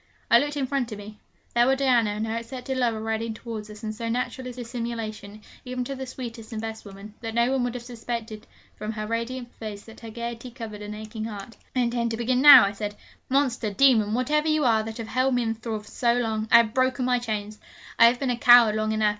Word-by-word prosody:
I - - +8
looked 290 0 -2
in 275 - 0
front 260 -3 -2
of 210 - -5
me: 210 +1 -11 0.3
there 240 +1 +4
were 270 - +4
Diana 250 -5 +3
and 210 +1 -2
her 225 0 -3
accepted 250 +3 -5
lover 235 -4 0
riding 220 0 -3
towards 220 -2 -7
us; 210 +1 -11
and 215 0 -3
so 230 +1 -5
natural 250 +2 -3
is 250 - -7
dissimulation, 225 -4 -6 0.2
even 250 0 -4
to 275 - -5
the 265 -1 -6
sweetest 235 -3 -8
and 220 - -4
best 220 0 -6
women, 200 +1 -11
that 225 -1 -5
no 235 +2 +3
one 265 -2 +1
would 245 0 -2
have 245 - -6
suspected 230 -2 -6 0.3
from 215 +1 -5
her 215 -1 -4
radiant 235 +2 -4
face 210 -2 -8
that 225 - -13
her 230 - -9
gaiety 235 +2 -6
covered 225 -4 -8
an 210 0 -6
aching 215 +1 -6
heart. 215 +1 -8 0.2
'I 255 - +2
intend 235 -1 0
to 225 - -3
begin 250 +2 +1
now,' 275 -5 +10
I 200 - -1
said. 205 0 -5 0.3
'Monster, 255 -5 +1
demon, 220 -4 +4
whatever 300 +5 +1
you 310 -2 +2
are 225 -2 +4
that 220 0 -7
have 230 -2 -6
held 255 +2 +1
me 245 - +1
in 225 -1 -1
thrall 220 -1 -5
so 235 +3 0
long, 220 -3 -1
I 235 - +10
have 225 -2 +3
broken 255 0 +1
my 250 -1 +2
chains! 215 -2 -4 0.4
I 230 - +9
have 240 +1 +2
been 260 -1 -1
a 240 - -2
coward 240 -2 +7
long 215 0 0
enough. 215 -1 +2
230 Hz, 240 wpm, -25 LUFS, 215-250 Hz, 0.4 s, now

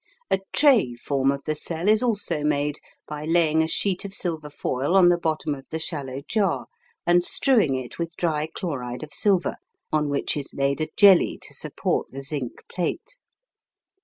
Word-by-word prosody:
A 195 - +3
tray 245 - +4
form 135 +2 0
of 140 0 -1
the 155 - 0
cell 165 +3 -3
is 215 +1 +5
also 205 -10 0
made 145 0 0 0.3
by 150 0 -6
laying 160 -1 +3
a 160 - +1
sheet 185 +2 0
of 200 0 -5
silver 160 -6 -3
foil 145 +3 -1
on 180 -2 +7
the 175 - +4
bottom 155 -2 -1
of 135 -1 -10
the 160 - -3
shallow 140 -4 -4
jar, 200 -5 0 0.4
and 175 0 +4
strewing 215 - +2
it 130 +2 -6
with 170 -1 -3
dry 155 -3 0
chloride 125 -8 -4
of 150 - -9
silver, 195 -4 +1 0.3
on 150 -1 +1
which 140 - 0
is 145 -2 -6
laid 140 +2 0
a 155 - 0
jelly 200 -4 +6
to - - -5
support - - -2
the 135 +1 -8
zinc 135 -3 -5
plate. 330 - -4
155 Hz, 180 wpm, -24 LUFS, 140-180 Hz, 0.4 s, on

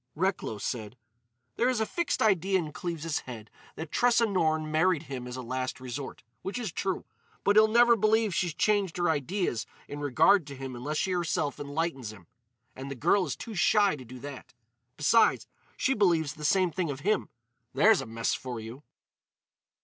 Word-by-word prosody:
Recklow 185 - -1
said: 110 +2 -5 0.6
"There 245 - +3
is 250 -3 0
a 220 - +1
fixed 340 +2 -1
idea 195 -2 +3
in 160 -4 -3
Cleves's 165 -3 -3
head 115 -4 -10 0.2
that 160 -1 -7
Tressa 240 -1 +3
Norne 160 -6 0
married 160 0 +2
him 130 -5 -6
as 125 - -6
a 130 - -5
last 130 +2 -3
resort, 130 +1 -7 0.2
which 195 - -4
is 230 -7 -3
true. 190 +2 -2 0.4
But 200 - +3
he'll 215 0 +7
never 235 +2 +5
believe 215 -1 +2
she's 170 -2 -1
changed 200 -2 +1
her 175 -2 +2
ideas 155 - -2 0.2
in 145 - -7
regard 150 +5 +4
to 140 - -8
him 135 -1 -6
unless 145 +6 -3
she 190 - 0
herself 165 -5 -1
enlightens 145 -5 -3
him. 100 -5 -14 0.5
And 135 +1 -7
the 140 - -5
girl 175 - +2
is 135 - -3
too 230 - -8
shy 205 -1 +3
to 135 - -10
do 125 +1 -11
that. 140 -2 -9 0.4
Besides, 220 +10 +4 0.3
she 270 - +2
believes 170 - +2
the 150 0 -7
same 185 +2 +3
thing 175 -1 -2
of 140 -1 -5
him. 210 +4 0 0.5
There's 215 -2 +5
a - - -7
mess 115 0 -1
for 125 -3 -5
you!" 115 +5 -9
160 Hz, 185 wpm, -28 LUFS, 135-195 Hz, 0.6 s, he'll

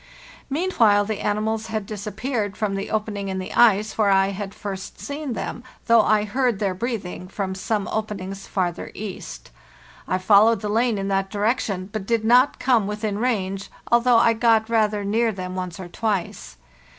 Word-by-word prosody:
Meanwhile 240 - +3
the 215 -1 -3
animals 215 +2 -1
had 220 -2 -3
disappeared 210 +1 -3
from 210 -3 -1
the 195 0 -3
opening 210 -2 -2
in 190 - -3
the 185 - -5
ice 215 -2 +4
where 210 -2 +4
I 195 0 +4
had 200 0 -6
first 195 -2 -7
seen 285 -2 -4
them, 235 - -5 0.2
though 230 -1 +6
I 215 0 +3
heard 245 +1 0
their 195 -2 -1
breathing 185 -4 -4
from 190 0 -3
some 200 +2 -2
openings 195 -3 -4
farther 175 -3 -2
east. 180 - -7 0.6
I 185 - +1
followed 205 +3 +5
the 210 - -3
lane 230 +1 +1
in 195 0 -3
that 195 0 0
direction, 205 -3 -1
but 210 -3 -4
did 230 -2 +1
not 250 +4 +5
come 240 -6 +2
within 210 0 -3
range, 195 -5 -1 0.2
although 240 0 +5
I 230 0 +5
got 225 -1 +2
rather 210 -2 +1
near 225 +3 +1
them 185 -2 -6
once 180 -2 -5
or 185 - -6
twice. 185 - -3
210 Hz, 175 wpm, -23 LUFS, 195-225 Hz, 0.6 s, though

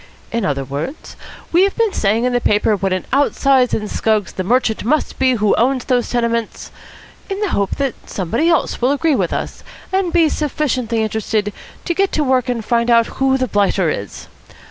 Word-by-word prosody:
In 230 -3 -1
other 140 -2 -1
words, 145 - -6 0.4
we've 380 +4 +3
been 455 -3 +1
saying 215 +3 +1
in 250 0 +1
the 245 - +1
paper 210 0 +2
what 195 -1 -2
an 185 0 -2
out 280 +1 +2
size 265 -3 +3
in 215 - -1
scugs 215 -1 0
the 185 - -3
merchant 230 +2 +1
must 295 +7 -1
be 260 -1 +3
who 210 -3 +2
owns 255 +2 +1
those 250 -2 0
tenements, 235 -2 -2 0.6
in 390 0 -3
the 415 - 0
hope 200 - -1
that 275 -3 -1 0.2
somebody 225 - 0
else 330 -6 0
will 250 - +3
agree 295 +1 +1
with 185 -7 0
us - - -4 0.3
and 380 -2 +1
be 335 -2 +4
sufficiently 255 -7 -1
interested 215 -1 -1 0.3
to 345 - 0
get 390 +2 +1
to 305 - +1
work 260 -2 +1
and 230 -3 -2
find 235 +1 +1
out 230 -1 +5 0.2
who 265 0 +3
the 255 -1 -1
blighter 195 -5 +1
is. 100 -7 -6
240 Hz, 195 wpm, -18 LUFS, 210-280 Hz, 0.6 s, out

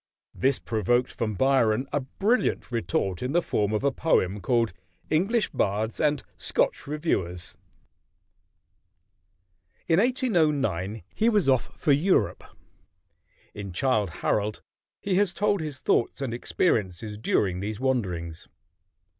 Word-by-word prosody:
This 135 0 +1
provoked 120 +3 0
from 110 -2 -3
Byron 130 0 +2
a 145 - +2
brilliant 200 - 0
retort 95 -4 -1
in 125 +3 -2
the 175 - +4
form 105 -1 0
of 105 +2 -1
a 140 - +3
poem 105 - +1
called 115 -7 +1 0.4
"English 200 +8 +1
Bards 105 +3 -1
and 150 -1 +1 0.2
Scotch - - 0
Reviewers." 120 - -2 2.3
In 165 +1 +4
1809 150 - +1
he 225 - +2
was 210 -9 +2
off 130 -2 +1
for 150 - +2
Europe. 165 +7 +2 1.1
In 100 -3 -7
"Childe 110 -1 +1
Harold" 105 +5 -1 0.4
he 200 - -2
has 200 -2 +2
told 205 -2 +1
his 150 -4 -5
thoughts 120 - +1
and 135 -4 -3
experiences 105 - -1
during 95 -3 0
these 105 +2 -4
wanderings. 90 -11 -2
125 Hz, 120 wpm, -26 LUFS, 105-155 Hz, 2.3 s, the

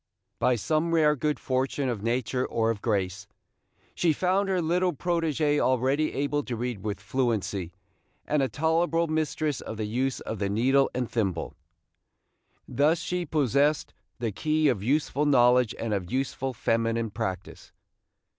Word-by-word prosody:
By 125 - +3
some 155 +8 0
rare 150 -2 +4
good 150 +2 -1
fortune 130 +1 -1
of 120 -5 -2
nature 125 +2 -1
or 115 -2 0
of 105 -3 -5
grace, 100 -3 -1 0.7
she 165 -3 +2
found 190 +5 +1
her 185 -1 +1
little 175 +2 +1
protégée 155 -2 0
already 130 +4 +1
able 145 +1 0
to 120 - -3
read 120 -2 -3
with 105 -2 -3
fluency, 110 -6 -1 0.5
and 150 -1 +1
a 135 - +1
tolerable 165 +2 +1
mistress 155 -3 -1
of 110 - -7
the 110 - -2
use 130 +5 -1
of 110 - -5
the 100 -1 -1
needle 130 +7 +3
and 125 -1 -1
thimble. 95 -9 -2 1.1
Thus 145 +6 +2
she 180 -2 -3
possessed 145 +1 +1 0.2
the 115 -3 -2
key 155 +7 +1
of 115 -7 0
useful 145 +4 +1
knowledge 125 -3 +4
and 115 -2 -2
of 95 -3 -3
useful 135 0 -2
feminine 115 0 0
practice. 95 -2 -5
130 Hz, 150 wpm, -27 LUFS, 115-155 Hz, 1.1 s, rare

